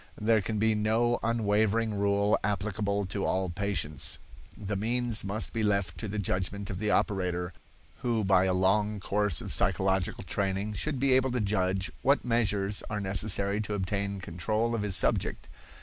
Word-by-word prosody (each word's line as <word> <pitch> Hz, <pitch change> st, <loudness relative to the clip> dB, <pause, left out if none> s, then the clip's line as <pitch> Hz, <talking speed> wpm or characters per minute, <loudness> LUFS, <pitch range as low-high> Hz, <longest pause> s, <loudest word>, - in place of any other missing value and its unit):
There 110 Hz, 0 st, +3 dB
can 105 Hz, +3 st, -3 dB
be 110 Hz, +1 st, +2 dB
no 110 Hz, +3 st, +1 dB
unvarying 110 Hz, 0 st, +1 dB
rule 100 Hz, 0 st, +2 dB
applicable 100 Hz, 0 st, -1 dB
to 95 Hz, +1 st, -3 dB
all 95 Hz, -1 st, 0 dB
patients. 85 Hz, -7 st, -2 dB, 0.4 s
The 100 Hz, -1 st, -4 dB
means 115 Hz, +2 st, +1 dB
must 105 Hz, +3 st, -1 dB
be 115 Hz, -, -1 dB
left 100 Hz, -3 st, 0 dB
to 110 Hz, -, -3 dB
the 105 Hz, +2 st, -4 dB
judgment 100 Hz, +1 st, -2 dB
of 90 Hz, -, -5 dB
the 105 Hz, 0 st, -1 dB
operator, 90 Hz, -4 st, 0 dB, 0.4 s
who 115 Hz, -3 st, 0 dB
by 95 Hz, -1 st, +4 dB
a 95 Hz, -, +1 dB
long 105 Hz, +3 st, +2 dB
course 100 Hz, -3 st, 0 dB
of -, -, -2 dB
psychological 95 Hz, 0 st, +2 dB
training 100 Hz, +2 st, -2 dB
should 140 Hz, +8 st, -2 dB
be 135 Hz, 0 st, +3 dB
able 130 Hz, 0 st, +3 dB
to 125 Hz, -, 0 dB
judge 95 Hz, -2 st, 0 dB
what 140 Hz, 0 st, +2 dB
measures 105 Hz, -4 st, +1 dB
are 105 Hz, -, -2 dB
necessary 100 Hz, +1 st, +1 dB
to 105 Hz, -1 st, -3 dB
obtain 100 Hz, 0 st, -2 dB
control 105 Hz, +7 st, -1 dB
of 115 Hz, -, -1 dB
his 105 Hz, -2 st, 0 dB
subject. 95 Hz, -, 0 dB
100 Hz, 165 wpm, -29 LUFS, 95-110 Hz, 0.4 s, by